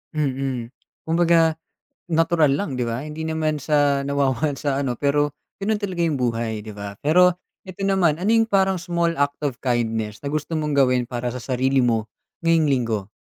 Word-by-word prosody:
Mm. 135 -5 -2 0.3
Kumbaga, 165 -1 +3 0.5
natural 165 -3 +2
lang 145 -2 -2
'di 125 - 0
ba? 115 +2 -3
Hindi 155 +2 -6
naman 160 -1 -1
sa 145 -1 +1
nawawalan 140 +1 0
sa 140 -3 -1
ano 130 -3 -1
pero 145 0 +1 0.2
ganun 205 +2 -1
talaga 185 -4 -2
yung 155 -4 0
buhay 115 -3 -1
'di 105 0 -9
ba? 100 0 -6
Pero 180 +5 +5 0.3
ito 185 0 -9
naman, 185 -6 +2
ano 195 - 0
yung 225 0 +3
parang 190 -2 +2
small 170 -1 0
act 145 0 0
of 135 -4 -2
kindness 115 -4 -1
na - - -1
gusto 155 +1 -2
mong 150 -1 -1
gawin 125 -2 +3
para 120 -1 -3
sa 125 - -5
sarili 130 +2 0
mo 115 -3 0 0.3
ngayong 165 -1 +3
Linggo? 115 -7 -1
145 Hz, 175 wpm, -22 LUFS, 125-165 Hz, 0.5 s, Pero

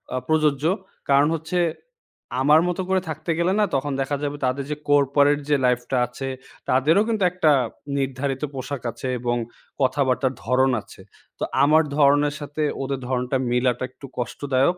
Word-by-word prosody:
আ - - 0
প্রযোজ্য। 150 -3 +2 0.5
কারণ 140 +1 +5
হচ্ছে, 160 +3 -2 0.8
আমার 150 +3 +6
মতো 180 +1 -1
করে 190 0 +2
থাকতে 155 +2 -3
গেলে 175 +2 +2
না? - - +4
তখন 140 +2 -1
দেখা 135 +2 -1
যাবে 145 0 -2
তাদের 135 +2 -1
যে, - - 0
কর্পোরেট 145 0 +4
যে 145 - +4
লাইফটা 125 +1 +1
আছে, 130 +2 -6 0.4
তাদেরও 150 +9 +4
কিন্তু 215 -4 0
একটা 180 -4 +3 0.5
নির্ধারিত 135 +1 -2
পোশাক 135 0 -5
আছে 120 +3 -6
এবং 120 0 0 0.5
কথাবার্তার 130 0 +1
ধরন 130 +2 +3
আছে। - - -15 0.4
তো - - -2 0.2
আমার 155 +3 +5
ধরনের 145 0 +4
সাথে, 145 +1 -5 0.2
ওদের 135 0 -3
ধরণটা 125 +1 0
মিলটা 125 0 +1
একটু 135 - -13
কষ্টদায়ক। 135 +6 0
140 Hz, 155 wpm, -23 LUFS, 130-150 Hz, 0.8 s, আমার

